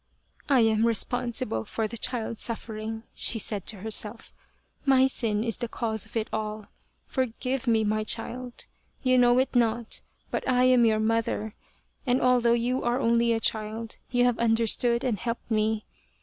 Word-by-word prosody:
" - - -32
I 265 -4 +5
am 220 -1 +3
really 230 - +3
responsible 240 - 0
for 220 - -3
the 230 - -8
child's 230 -1 -1
suffering," 220 -1 -4
she 235 - 0
said 205 -3 -1
to 200 -4 -1
herself" 220 +1 -3 0.5
my 265 -2 +5
sin 225 -5 0
is 230 -2 -1
the 240 - -3
cause 220 -2 -1
of 225 - -5
it 220 - -1
all; 215 -1 -4 0.4
forgive 255 0 -2
me, 225 -2 +3
my 215 0 0
child 245 +3 -2 0.4
you 255 -1 +4
know 245 0 +5
it 260 +1 +1
not, 235 -1 0 0.3
but - - -2
I 250 0 +3
am 255 -2 +5
your 220 -1 +2
mother; 220 -1 -1 0.5
and 250 +1 +3
although 245 -2 +3
you 245 +2 0
are 240 +1 +1
only 235 -1 +2
a 225 - +1
child 220 +1 -2
you 245 0 +2
have 245 -2 +1
understood 235 +1 +2
and 230 -6 -1
helped 235 +1 -5
me. 215 0 0
230 Hz, 175 wpm, -27 LUFS, 220-245 Hz, 0.5 s, I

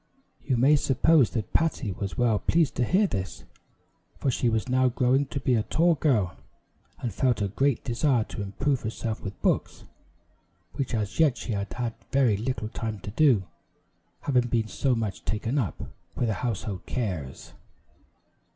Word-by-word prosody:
You 130 -3 0
may 140 +5 +5
suppose 135 0 +4
that 110 -6 -4
Patty 150 -9 +1
was 100 0 -5
well 115 -4 +2
pleased 160 - +2
to 125 - +2
hear 190 - +3
this, 95 - -4 0.7
for 135 - 0
she 120 0 +1
was 110 0 -1
now 130 0 +3
growing 130 +3 +2
to 140 - -4
be 130 -1 +1
a 115 - +3
tall 170 +9 +3
girl, 120 - +1 0.6
and 120 -5 -4
felt 125 +3 +1
a 100 -1 0
great 135 +5 +1
desire 120 0 +1
to 105 - -7
improve 130 +7 -1
herself 110 0 -4
with 100 -1 -7
books, - - 0 0.9
which 135 -3 -2
as 105 +3 -3
yet 150 -6 +4
she - - -5
had 100 -1 -3
had 120 -2 -2 0.2
very 130 -6 +3
little 110 0 -3
time 110 -2 -4
to 100 - -6
do, 125 -5 +4 0.8
having 125 -4 +2
been 115 -2 0
so 130 +3 0
much 105 -5 -3
taken 115 +6 -1
up 110 -9 -1 0.4
with 120 - 0
her - - +1
household 100 -3 -4
cares. 90 - -4
120 Hz, 170 wpm, -27 LUFS, 105-135 Hz, 0.9 s, may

